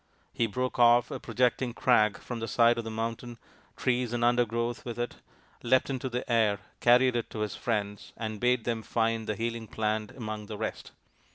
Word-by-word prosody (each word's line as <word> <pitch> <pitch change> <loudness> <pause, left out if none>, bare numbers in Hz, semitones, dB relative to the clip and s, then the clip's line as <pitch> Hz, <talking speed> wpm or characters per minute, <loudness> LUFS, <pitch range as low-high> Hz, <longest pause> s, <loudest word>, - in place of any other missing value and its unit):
He 115 - +1
broke 125 +4 -3
off 120 0 +5
a - - -4
projecting 125 +1 0
crag 110 -5 +3
from 120 -2 -6
the 115 - -3
side 115 +2 +4
of - - -3
the 110 - -5
mountain, 115 +2 -4 0.4
trees 125 -2 0
and 120 0 -1
undergrowth 120 0 +1
with 120 -2 -6
it, 120 0 -3 0.4
leapt 130 +3 +2
into 130 0 -3
the 125 0 -4
air, 110 -4 +3 0.2
carried 125 +1 +5
it 120 - -2
to 110 - -5
his 105 -2 -2
friends 105 -3 -3
and 110 -2 -4
bade 125 0 +2
them 115 -1 -2
find 115 0 -1
the 110 - -1
healing 115 +1 -3
plant 110 -1 -1
among 110 -3 -5
the 105 - -6
rest. 110 - -4
115 Hz, 190 wpm, -29 LUFS, 110-120 Hz, 0.4 s, off